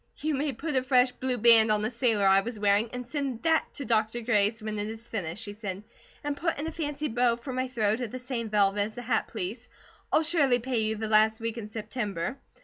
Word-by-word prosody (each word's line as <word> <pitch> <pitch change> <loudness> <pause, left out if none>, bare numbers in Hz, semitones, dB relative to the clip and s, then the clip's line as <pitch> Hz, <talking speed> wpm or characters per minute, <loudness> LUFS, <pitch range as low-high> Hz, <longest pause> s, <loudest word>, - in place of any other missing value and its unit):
"You 310 0 -1
may 285 +1 0
put 295 +4 -4
a 260 - +3
fresh 255 -1 +3
blue 255 0 -2
band 225 -1 +7
on 210 0 +2
the 215 - -1
sailor 230 -4 +1
I 195 0 +6
was 230 +3 -5
wearing, 205 +2 +2
and 250 -1 -6
send 275 -4 -3
that 320 -1 +2
to 280 - -5
Dr. 225 0 0
Gray's 220 -1 +2
when 215 -1 -3
it 205 - -2
is 225 +1 -8
finished," 190 -1 -4
she 205 - -6
said. 205 -2 -6 0.4
"And 290 0 -2
put 330 +3 -1
in 300 - -3
a 325 - -3
fancy 300 -2 -3
bow, 240 -1 +2
for 245 +3 -7
my 255 +1 -1
throat, 220 -2 0
of 240 - -3
the 255 - -6
same 250 -3 -4
velvet 205 -1 +2
as 215 +2 -2
the 245 - -6
hat, 230 -2 0
please. 220 +3 -6 0.4
I'll 315 - +4
surely 300 -6 +3
pay 245 0 -2
you 220 0 0
the 220 0 -4
last 220 +1 +4
week 230 0 -4
of 210 -2 -6
September. 215 0 -4
230 Hz, 240 wpm, -28 LUFS, 215-255 Hz, 0.4 s, band